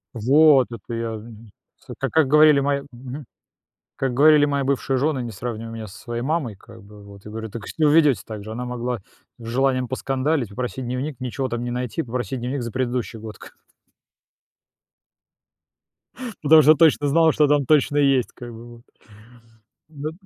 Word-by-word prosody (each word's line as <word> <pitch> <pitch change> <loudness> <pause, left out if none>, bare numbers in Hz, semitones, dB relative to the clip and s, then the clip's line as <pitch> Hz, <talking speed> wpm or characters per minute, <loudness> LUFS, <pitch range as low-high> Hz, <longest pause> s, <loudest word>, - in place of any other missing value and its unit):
вот, 135 +3 +5
это 115 +1 -8
я, 115 0 -3
мгм. 110 0 -13 0.3
С - - -11
ка - - -1
как 160 -3 +3
говорили 150 0 +6
мои 140 0 0
мгм. 130 +3 -9 0.7
Как 135 -2 -2
говорили 150 +2 +6
мои 140 -1 -1
бывшие 135 0 -1
жены: 140 0 0
"Не 120 - -5
сравнивай 115 +1 -6
меня 110 -1 -7
со 95 - -13
своей 120 -1 -5
мамой", 140 -5 -2
как 115 +3 -16
бы 105 +1 -15
вот. 100 -1 -14
Я 105 - -9
говорю: 110 0 -6
"Так 115 0 -7
вы - - -9
себя 155 -2 +1
ведёте 150 -4 +4
так 105 -2 -7
же". 110 - -8
Она 120 +3 -5
могла 125 -1 -4 0.4
с 115 - -12
желанием 130 +1 0
поскандалить, 135 +1 -1
попросить 125 +4 -5
дневник, 130 +3 -4
ничего 130 +1 -3
там 120 -1 -4
не 120 - -3
найти, 125 +5 -3
попросить 125 +1 -4
дневник 125 +2 -3
за 115 - -5
предыдущий 125 -2 -3
год 110 0 -9
к - - -15 2.9
Потому 155 +1 +7
что 155 +2 +6
точно 150 -1 +3
знал, 160 +2 +4
что 150 0 +3
там 145 -1 +2
точно 145 +1 +2
есть 135 -4 +2
как 120 -1 -10
бы 115 +1 -11
вот. 120 - -12
Да, - - -15
да. 115 - -20 1.1
Да 155 0 -6
125 Hz, 185 wpm, -22 LUFS, 115-145 Hz, 2.9 s, Потому